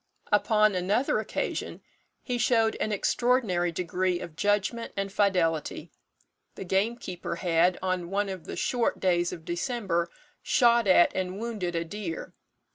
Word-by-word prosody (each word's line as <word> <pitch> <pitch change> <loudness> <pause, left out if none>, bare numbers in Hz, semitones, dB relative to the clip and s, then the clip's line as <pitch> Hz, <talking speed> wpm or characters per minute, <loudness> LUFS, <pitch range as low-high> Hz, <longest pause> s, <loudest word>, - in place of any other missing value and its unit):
"Upon 215 0 +4
another 195 +8 +1
occasion - - -4 0.4
he 245 -2 -2
showed 225 -2 +3
an 215 - -1
extraordinary 210 -5 +1
degree 180 +1 -1
of 165 -3 -8
judgment 205 +5 0
and 195 0 -2
fidelity. 180 -7 0 0.6
The - - -6
gamekeeper 190 -2 -2
had, 175 +1 +2
on 185 -2 -1
one 200 +2 0
of 190 -3 -6
the - - -6
short 245 -2 0
days 175 -2 +1
of 165 -3 -9
December, 175 -2 -1 0.3
shot 235 -6 +3
at 185 -2 +5
and 185 0 -2
wounded 210 -7 -3
a 165 0 -1
deer. 170 -2 -6
190 Hz, 135 wpm, -27 LUFS, 175-220 Hz, 0.6 s, at